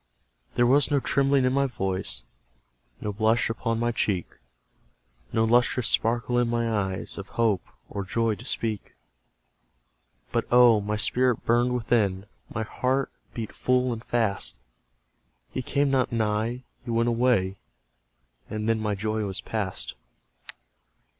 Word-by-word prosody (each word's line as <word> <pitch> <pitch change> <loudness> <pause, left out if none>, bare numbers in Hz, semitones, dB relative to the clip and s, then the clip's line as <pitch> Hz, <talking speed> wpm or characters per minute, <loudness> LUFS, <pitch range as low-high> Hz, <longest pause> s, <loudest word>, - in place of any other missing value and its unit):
There 120 - +4
was 140 +4 +4
no 145 -2 +3
trembling 135 0 +2
in 130 - +2
my 140 0 +2
voice, 95 - -3 0.8
No 105 - -3
blush 110 +2 +2
upon 115 +1 -1
my 120 +1 +1
cheek, 100 -6 0 1.1
No 110 - +2
lustrous 120 0 +3
sparkle 120 +2 +1
in 120 - +2
my 115 0 0
eyes, 95 -1 -2
Of 100 - -8
hope, 110 -5 +3 0.3
or 100 - -4
joy, 115 +3 0
to 105 - -9
speak; 110 -5 -2 1.4
But, - - 0
oh! 120 -3 +6
my 105 +1 -2
spirit 125 +2 +2
burned 120 +2 +3
within, 105 -5 +1 0.3
My 115 - -2
heart 130 +5 -1 0.2
beat 115 -2 -5
full 125 -1 +1
and 115 0 -7
fast! 110 -6 0 1.0
He - - -2
came 140 +2 +1
not 130 -2 +2
nigh 115 +2 0 0.2
he - - -9
went 115 0 +2
away 115 -6 +2 0.9
And 110 0 -3
then 115 -1 +2
my 105 -1 -1
joy 110 +2 -1
was 95 -2 -4
past. 105 -4 -4
115 Hz, 140 wpm, -26 LUFS, 105-125 Hz, 1.4 s, oh